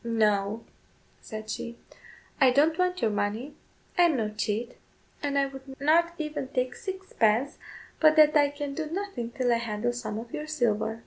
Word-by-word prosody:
"No," 215 -2 +1 0.5
said 215 -1 -8
she, 235 +2 -5 0.6
"I 265 - +7
don't 300 +6 +3
want 365 0 +1
your 220 - +3
money; 210 +7 -2 0.5
I 350 - +8
am 320 -5 +2
no 215 -3 0
cheat, 215 +3 -3 0.4
and 285 -1 -1
I 275 - +4
would 270 0 -10
not 335 +4 +3
even 300 -3 -3
take 255 -1 -1
sixpence, 280 - 0 0.4
but 310 -1 +6
that 305 -1 +6
I 290 -1 +5
can 285 -1 -5
do 310 +2 -3
nothing 365 -10 -4
till 245 0 +1
I - - +3
handle 230 +1 -2
some 215 -3 -4
of 230 +1 -8
your 300 - -4
silver." 225 -6 0
255 Hz, 175 wpm, -28 LUFS, 225-305 Hz, 0.6 s, I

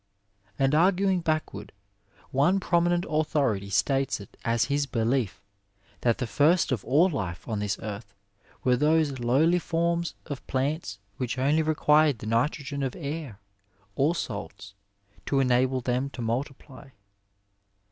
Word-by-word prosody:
And 135 +1 +2
arguing 185 +3 +3
backward, 155 - -3 0.6
one 150 +8 +3
prominent 175 -1 +1
authority 145 -10 0
states 135 +7 +1
it 100 - -13
as 115 0 +1
his 140 0 0
belief 115 -4 -1 0.6
that 120 -2 +1
the 125 - -2
first 155 +6 +2
of 120 -6 -1
all 155 +8 +4
life 95 - -4
on 110 -3 -2
this 105 0 -1
earth 100 -1 -7 0.5
were 125 -1 +3
those 150 0 +2
lowly 145 +9 +3
forms 170 0 -1
of 140 -3 -7
plants 135 - -2 0.2
which 125 0 -3
only 145 +5 +2
required 155 -2 +3
the 110 - -9
nitrogen 140 +5 -1
of 135 -2 -2
air 145 - -6 0.6
or 150 +7 +2
salts 100 - -6 0.5
to 140 - +2
enable 130 0 +2
them 125 +3 -1
to 130 - -8
multiply. 135 +3 -5
135 Hz, 135 wpm, -27 LUFS, 120-155 Hz, 0.6 s, all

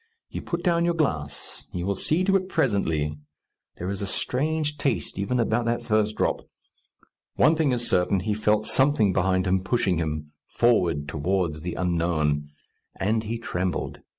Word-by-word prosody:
You - - -4
put 170 0 -4
down 170 -1 +2
your 170 0 +1
glass; 80 - -3
you 90 0 -3
will 100 - +1
see 155 - 0
to 195 +1 +3
it 185 -1 +1
presently; 80 - 0 0.6
there 90 +3 -3
is 100 - -4
a 100 - -2
strange 150 +7 -1
taste 120 -9 -1
even 125 +6 0
about 115 +1 +1
that 120 0 0
first 110 -1 +1
drop. - - 0 0.9
One 155 - +5
thing 155 -4 +2
is 120 -1 0
certain: 90 +1 +2
he 105 +2 -1
felt 105 0 +1
something 130 -8 +3
behind 95 0 +2
him 95 0 +1
pushing 95 -4 +1
him, 75 -2 -3 0.2
forward 90 -11 +2
towards 80 +1 -1
the 85 +2 -4
unknown. 80 -4 0 0.5
And 110 +3 +1
he 115 +2 -3
trembled. 90 -5 -3
100 Hz, 165 wpm, -25 LUFS, 90-125 Hz, 0.9 s, One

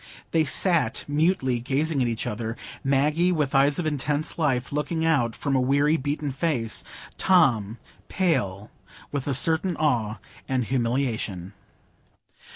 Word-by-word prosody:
They 160 -1 +2
sat 155 - +1
mutely 145 -4 +1
gazing 140 +4 -1
at 125 - +2
each 115 -1 -2
other,—Maggie 135 +9 -1
with 150 -6 0
eyes 140 +1 +4
of 175 - -1
intense 150 +1 -1
life 130 -5 0
looking 160 +3 -1
out 135 -8 +1
from 140 -1 -1
a 130 - +3
weary, 140 +4 +3
beaten 145 0 -2
face; 130 -6 -1 0.4
Tom 120 - +3 0.3
pale, 105 - -1 0.4
with 140 -2 -3
a 140 - 0
certain 160 +6 +2
awe 120 -8 0 0.3
and 130 -2 0
humiliation. 115 -7 -2
140 Hz, 130 wpm, -25 LUFS, 120-155 Hz, 0.4 s, eyes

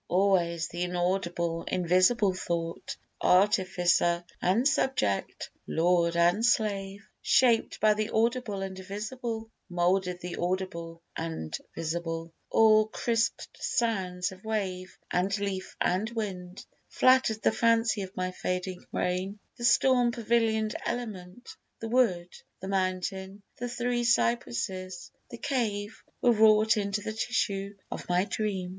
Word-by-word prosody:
Always 175 -3 +2
th' 175 - -5
inaudible, 175 -1 -1
invisible 185 +4 +3
thought 170 -2 -4 0.2
Artificer 180 -3 +3 0.2
and 215 +9 +3
subject, 265 - 0 0.2
lord 170 0 +2
and 175 +6 +3
slave 205 -3 0
Shaped 240 -3 +3
by 215 0 +5
the 215 0 -2
audible 225 -3 0
and 190 -1 -5
visible, 220 +4 -5 0.2
Moulded 180 +1 +1
the 180 -1 -6
audible 170 -2 -3
and 160 - -4 0.2
visible; 165 0 -3 0.2
All 215 -1 +5
crisped 230 +1 -1
sounds 185 -6 -1
of 190 0 -13
wave, 190 -4 -3
and 190 +3 +1
leaf 200 -2 -4
and 190 +5 +1
wind, 190 -5 -5 0.2
Flatter'd 255 -4 +3
the - - +4
fancy 225 -2 +2
of 190 0 -8
my 185 0 -1
fading 180 0 -3
brain; 185 +3 -2 0.2
The 235 - -3
storm 240 +1 +4
pavilion'd 225 -2 +1
element, 225 -2 -6 0.2
the 225 - -5
wood, 190 -8 +1 0.3
The 190 - -7
mountain, 190 +1 -2
the 245 +1 -4
three 240 0 -1
cypresses, 185 - -1 0.2
the 235 - -8
cave, 220 -6 -2 0.2
Were 245 - +6
wrought 215 0 +5
into 205 0 -1
the 220 +1 -4
tissue 200 -3 -1 0.2
of - - -6
my 180 +2 +2
dream. 200 -4 -2
195 Hz, 125 wpm, -28 LUFS, 180-225 Hz, 0.3 s, Were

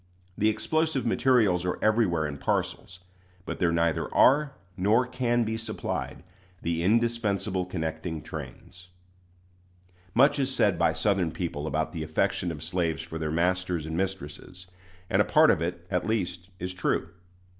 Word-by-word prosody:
The 110 - +2
explosive 155 +6 0
materials 115 -7 +3
are 90 - -1
everywhere 105 -8 +2
in 70 -1 -5
parcels; 90 +5 -2 0.4
but - - -5
there 85 -2 +2
neither 85 -1 0
are, 145 +1 +4 0.2
nor 105 +6 +3
can 125 -1 0
be 110 0 -2
supplied, 110 -5 -4 0.4
the 85 0 -1
indispensable 105 -2 +1
connecting 80 -2 -4
trains. 90 0 -9 1.3
Much 140 +4 +5
is 135 -1 +1
said - - +2
by - - +3
Southern 95 -5 +1
people 80 -4 -4
about 80 +1 -1
the 80 - -4
affection 80 +2 0
of 75 -1 -6
slaves 80 -1 -1
for 80 0 -7
their 80 -1 -2
masters 90 0 0
and 80 0 -4
mistresses; 90 -1 -5 0.4
and - - +3
a - - +5
part - - +5
of - - 0
it, 85 0 -3
at 90 - 0
least, 90 -4 -2
is 90 +1 -4
true. 90 - -1
90 Hz, 150 wpm, -27 LUFS, 85-110 Hz, 1.3 s, Much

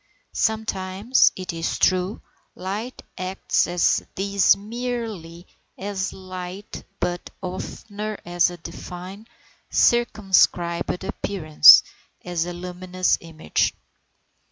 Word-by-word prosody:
Sometimes, 220 +1 +2
it 185 -2 -5
is 165 0 -2
true, 185 +2 +1 0.3
light 210 +7 -5 0.2
acts 185 +1 0
with 175 0 +1
these 200 +1 +3
merely 215 -6 -5 0.3
as 195 -1 -3
light, 185 +1 -8 0.2
but 175 0 -3
oftener 205 +3 -6
as 175 0 +2
a 175 - -9
defined, 180 +5 -9 0.4
circumscribed 190 -7 +2
appearance, 170 -6 +6 0.4
as 175 -1 -2
a 175 - -4
luminous 180 +1 -1
image. 160 - -1
185 Hz, 90 wpm, -23 LUFS, 175-205 Hz, 0.4 s, appearance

